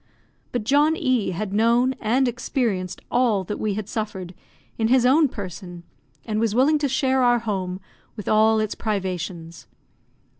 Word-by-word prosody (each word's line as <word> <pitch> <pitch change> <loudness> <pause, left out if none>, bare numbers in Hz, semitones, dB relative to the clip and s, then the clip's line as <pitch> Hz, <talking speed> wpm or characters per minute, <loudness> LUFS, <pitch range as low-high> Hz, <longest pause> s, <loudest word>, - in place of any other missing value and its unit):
But 245 -3 -2
John 290 +7 +3
E 255 -8 0
had 190 +2 -4
known 235 +4 +3
and 250 +4 +2
experienced 230 - -2
all 235 -6 +2
that 205 +3 -5
we 210 -2 -1
had 210 -1 -4
suffered, 200 -5 -5 0.5
in 220 - +2
his 250 +1 +4
own 290 +4 +5
person, 180 -5 -8 0.4
and 215 -2 -2
was 225 -1 0
willing 290 +5 +4
to 285 -1 0
share 265 0 +1
our 245 -1 +4
home 190 -5 -3 0.4
with 210 - -8
all 220 +1 +4
its 215 -1 -1
privations. 180 -5 -4
220 Hz, 155 wpm, -23 LUFS, 195-250 Hz, 0.5 s, own